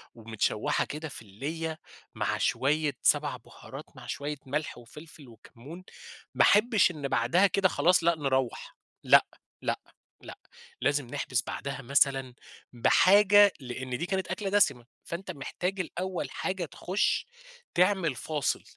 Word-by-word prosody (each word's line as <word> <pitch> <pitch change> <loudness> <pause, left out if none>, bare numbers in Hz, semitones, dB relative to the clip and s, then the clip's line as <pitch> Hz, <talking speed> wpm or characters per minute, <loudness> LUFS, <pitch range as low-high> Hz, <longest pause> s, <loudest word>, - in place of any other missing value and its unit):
ومتشوِّحة 110 -2 -1
كده 155 +2 -6
في 130 - -10
الليّة 155 +10 -5 0.4
مع - - -1
شوية 150 +2 +1
7 - - +2
بهارات - - -12
مع - - -12
شوية 145 +1 -4
ملح 150 +4 -3
وفلفل 150 +5 -13
وكمُّون، 125 - -13 0.5
ما - - +2
أحبش 210 -2 +4
إن 150 -4 -5
بعدها 135 +11 +3
كده 195 0 +2
خلاص، 175 +4 +3
لأ 170 0 +3
نروَّح، 135 -4 -2 0.3
لأ، - - +6 0.4
لأ، - - -1 0.4
لأ، - - -10 0.4
لازم 145 0 +1
نحبِس 130 -3 -2
بعدها 140 -1 -5
مثلًا 135 -1 +1 0.4
بحاجة، 200 - +6
لإن 130 0 -5
دي 170 - -3
كانت 190 0 -2
أكلة 205 -3 -3
دسِمة، 190 -12 +2 0.2
فأنتَ 170 +3 -6
محتاج 180 +7 -4
الأول 185 +1 -4
حاجة 185 -2 -3
تخُش 185 +5 -1 0.5
تعمل 180 -5 +2
فاصِل، 150 +2 -2
150 Hz, 130 wpm, -28 LUFS, 130-185 Hz, 0.5 s, لأ